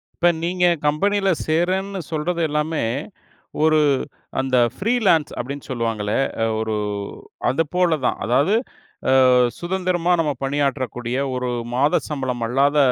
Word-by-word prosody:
இப்ப, 175 - +3
நீங்க 180 +1 +1 0.2
கம்பெனில 195 +6 +2 0.2
சேர்றேன்னு 185 +4 0
சொல்றது 165 +2 -1
எல்லாமே, 150 0 -1 0.8
ஒரு 155 -1 +4 0.6
அந்த 130 -1 0 0.2
ஃபிரீலான்ஸ் 200 -8 +2
அப்பிடின்னு 140 +3 -6
சொல்லுவாங்களே! 115 -4 -1 0.3
அ - - +3
ஒரு 110 -1 -1 0.8
அதுபோல 165 +3 +1
தான். - - -1
அதாவது 140 - +3 0.6
அ - - +5 0.5
சுதந்திரமா 180 -1 0
நம்ம 150 -2 0
பணியாற்றக்கூடிய 130 -3 -1 0.2
ஒரு 125 -1 -2 0.3
மாத 145 +4 +3
சம்பளம் 130 -5 -3
அல்லாத 140 +3 +2
150 Hz, 110 wpm, -21 LUFS, 130-180 Hz, 0.8 s, அ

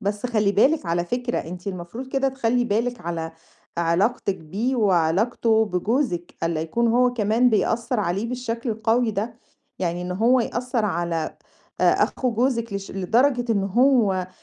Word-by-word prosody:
بس 205 +2 -2
خلَّي 215 -4 +1
بالِك 275 - +3
على 170 +1 0
فكرة 245 +4 -2
أنتِ 180 +3 -7
المفروض 195 +7 -6
كده 270 0 +1
تخلَّي 245 -2 0
بالِك 235 +2 -1
على 165 -1 -4 0.5
علاقتِك 190 +4 +1
بيه 210 +12 -2
وعلاقته 220 +4 +2
بجوزِك، 205 -1 -1
ألّا 165 -1 0
يكون 230 +9 0
هو 245 +1 +3
كمان 230 +2 +2
بيأثر 230 +2 0
عليه 195 +4 -1
بالشكل 240 -1 -3
القوي 225 +2 +1
ده، 220 +3 -3 0.4
يعني 175 -1 -2
إن 180 0 -4
هو 235 +6 +3
يأثر 240 0 -1
على 170 -4 -2 0.4
أخو 255 - +2
جوزِك 235 -1 0
لش 200 0 -5
لدرجة 240 +5 +1
إن 200 -2 0
هو 205 -4 +2
220 Hz, 145 wpm, -23 LUFS, 180-245 Hz, 0.5 s, بالِك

